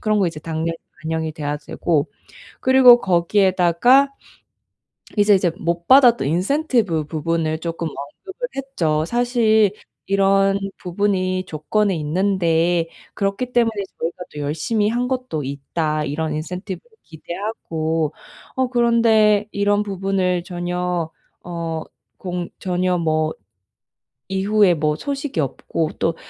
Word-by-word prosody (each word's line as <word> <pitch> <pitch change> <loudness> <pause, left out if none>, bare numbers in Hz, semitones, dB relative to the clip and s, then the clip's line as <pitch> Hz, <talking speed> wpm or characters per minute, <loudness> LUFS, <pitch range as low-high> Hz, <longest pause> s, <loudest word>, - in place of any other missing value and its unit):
그런 215 -1 +1
거 190 - +3
이제 165 -2 -4
당연히 160 +1 -2 0.3
반영이 160 0 -2
돼야 150 -1 -3
되고 150 0 -1 0.5
그리고 255 -2 +7
거기에다가 190 +7 +3 1.1
이제 205 0 +5
이제 180 -3 +2
못 170 +1 -2
받았던 245 - +6
인센티브 200 - +1
부분을 160 +1 -1
쪼끔 165 0 -3
언급을 380 - -7
했죠. 165 - -1
"사실 230 -3 +3 0.4
이런 195 0 +3 0.2
부분이 185 0 -1
조건에 190 +6 0
있는데 170 0 +1 0.3
그렇기 200 +5 -2
때문에 235 -2 +3 0.3
저희가 170 +2 -3
또 150 - -7
열심히 165 +9 0
한 245 +2 0
것도 255 - -3
있다, 150 +3 -2
이런 155 +2 -2
인센티브를 180 - -6
기대하고. 160 -3 -3 0.4
어 260 -1 +1
그런데 230 -4 +3
이런 205 +1 +1
부분을 190 -3 -1
전혀 175 -2 -2 0.3
어 165 -2 -4 0.3
공 180 -2 -4
전혀 180 -1 0
뭐 155 -1 0 1.0
이후에 195 0 +3
뭐 150 -1 0
소식이 280 - -3
없고 155 +3 -2
또 165 0 +1
180 Hz, 260 characters per minute, -21 LUFS, 160-210 Hz, 1.1 s, 그리고